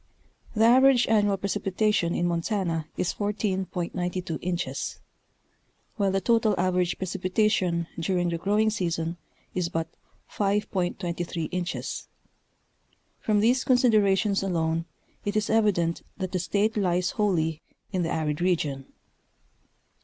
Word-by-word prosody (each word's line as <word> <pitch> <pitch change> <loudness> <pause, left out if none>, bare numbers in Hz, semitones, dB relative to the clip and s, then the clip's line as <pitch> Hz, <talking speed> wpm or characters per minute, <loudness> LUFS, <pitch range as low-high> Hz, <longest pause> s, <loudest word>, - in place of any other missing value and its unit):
The 220 +1 +4
average 255 +1 +6
annual 205 -3 +3
precipitation 195 -1 0
in 175 - 0
Montana 170 -2 -1
is 180 - 0
14.92 185 -4 -2
inches, 175 0 -3 1.0
while 200 -2 +2
the 195 0 +1
total 220 0 +2
average 180 -1 +1
precipitation 185 -1 0
during 175 +1 0
the 170 -1 -2
growing 210 +4 +2
season 170 -4 -2 0.4
is 180 -2 -1
but 165 -2 -2 0.4
5.23 175 -5 -1
inches; 180 -1 -3 1.1
from 210 -1 +1
these 245 +4 +3
considerations 215 -6 +3
alone 165 -3 0 0.4
it 205 +1 -2
is 215 - 0
evident 200 -7 +2 0.2
that 185 -2 -3
the 185 - -1
State 205 +5 0
lies 180 -3 +1
wholly 165 -7 0 0.3
in 185 - 0
the 165 - -1
arid 150 -1 -1
region. 150 -7 -1
185 Hz, 115 wpm, -26 LUFS, 170-210 Hz, 1.1 s, average